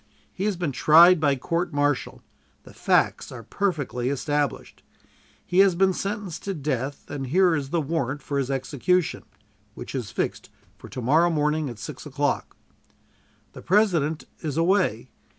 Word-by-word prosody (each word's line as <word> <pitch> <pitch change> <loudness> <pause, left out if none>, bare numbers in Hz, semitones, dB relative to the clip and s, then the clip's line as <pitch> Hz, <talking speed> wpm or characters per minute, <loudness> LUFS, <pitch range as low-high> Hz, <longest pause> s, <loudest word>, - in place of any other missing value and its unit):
He 190 - -3
has 210 -4 0
been 170 -4 -2
tried 165 +6 +6
by 145 -3 +2
court 170 +7 -2
martial; 145 -1 -1 0.4
the - - -15
facts - - +1
are - - -9
perfectly 145 -11 -2
established, 145 0 -2 0.6
he 180 - +1
has 195 -2 +5
been 190 +1 +3
sentenced 195 -3 -4
to 195 -1 -2
death, 135 -2 -3
and 135 -2 -4
here 180 +5 +3
is 140 -3 -2
the 170 +2 0
warrant 145 -2 -2
for 140 0 -2
his 135 -1 -2
execution, 145 +6 0 0.5
which - - -8
is 125 -6 -4
fixed - - -3 0.3
for - - -13
to 125 - -6
morrow 160 +8 +4
morning 150 -2 0
at 120 - -8
six - - -8
o'clock. - - -2 1.0
The - - -10
President 170 -6 +1 0.2
is 150 -2 -4
away. 165 - +1
155 Hz, 155 wpm, -24 LUFS, 135-180 Hz, 1.0 s, tried